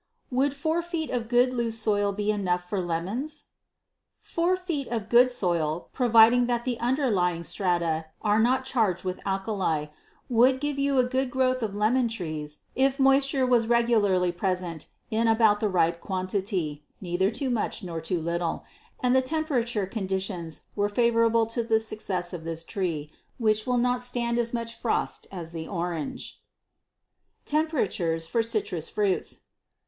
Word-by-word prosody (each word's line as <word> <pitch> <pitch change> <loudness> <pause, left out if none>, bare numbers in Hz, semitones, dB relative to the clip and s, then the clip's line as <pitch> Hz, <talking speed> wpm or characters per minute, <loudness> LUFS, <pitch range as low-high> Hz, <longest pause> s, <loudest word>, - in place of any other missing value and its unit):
Would 270 +2 +1
four 315 +4 0
feet 335 -2 -4
of 235 -3 -2
good 250 +1 +3
loose 235 -2 -1
soil 205 -2 +1
be 210 +1 -1
enough 180 -4 -1
for 195 +1 -1
lemons? 185 - -3 0.8
Four 345 +2 0
feet 335 -7 -3
of 225 -3 -3
good 245 +2 +6
soil, 170 -8 -1
providing 240 0 +5
the 240 0 -1
underlying 210 - +1
strata 170 -2 -1
are 210 0 +2
not 255 +3 +2
charged 220 -9 0
with 185 -1 -4
alkali, 190 -6 -1 0.4
would 255 +2 +4
give 290 0 -2
you 280 -1 +1
a 255 - +5
good 260 +1 -1
growth 255 0 +1
of 210 -3 -3
lemon 235 +4 +2
trees 155 -8 -5
if 270 +1 +2
moisture 270 0 +3
was 240 -3 +3
regularly 215 -7 +3
present 175 -3 -3 0.2
in 225 +1 +2
about 220 -2 +4
the 215 - 0
right 170 -2 +1
quantity, 185 -5 -2 0.2
neither 185 +1 0
too 250 +4 -2
much 225 -3 -2
nor 165 -3 -5
too 165 0 -2
little, 170 0 -2 0.4
and 250 0 +3
the 260 - +5
temperature 255 - 0
conditions 190 -4 -3
were 205 0 +1
favorable 230 0 +3
to 230 +2 -2
the 225 -1 +2
success 195 -5 -3
of 170 -2 -6
this 165 0 -4
tree, 165 -6 -3 0.3
which 215 -2 +1
will 250 -1 +2
not 245 0 +1
stand 240 -1 +2
as 235 -1 0
much 230 -1 -3
frost 235 - 0
as 170 -4 -6
the 165 -1 -6
orange. 170 -4 -4 1.0
Temperatures 215 - 0
for 230 +8 +1
Citrus 210 -8 -2
Fruits. 205 -3 -1
220 Hz, 155 wpm, -26 LUFS, 180-245 Hz, 1.0 s, good